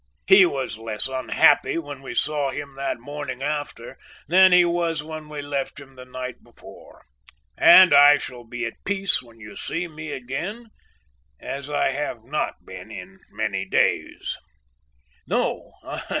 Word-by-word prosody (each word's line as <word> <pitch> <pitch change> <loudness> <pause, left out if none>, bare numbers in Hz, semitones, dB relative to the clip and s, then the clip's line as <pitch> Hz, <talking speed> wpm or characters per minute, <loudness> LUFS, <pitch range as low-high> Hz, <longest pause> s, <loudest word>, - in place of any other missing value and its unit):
He 190 -1 +7
was 135 -7 -4
less 110 -2 -2
unhappy 130 +5 +2
when 145 -4 -6
we 135 - -8
saw 145 -2 0
him 140 0 -6
that 135 -3 -3
morning 140 0 -6
after 145 0 -5 0.3
than 185 +3 +6
he 180 0 +6
was 170 -3 -1
when 155 -1 -8
we 150 -1 -6
left 140 0 -4
him 135 -1 -15
the 125 0 -11
night 130 0 -7
before, - - -16 0.5
and 185 -4 +8
I 145 +1 +8
shall 125 -3 -8
be 120 +1 -5
at 115 - -8
peace 195 -6 0
when 115 -2 -19
you 105 -2 -11
see 175 +2 -4
me 155 -1 -8
again, 175 - -6 0.7
as 140 +1 -6
I 145 -2 +1
have 130 -5 -4
not 145 +6 -4
been - - -10
in - - -10
many 95 0 -2
days. 95 - -1 0.9
"No! - - -1
145 Hz, 150 wpm, -23 LUFS, 130-155 Hz, 0.9 s, and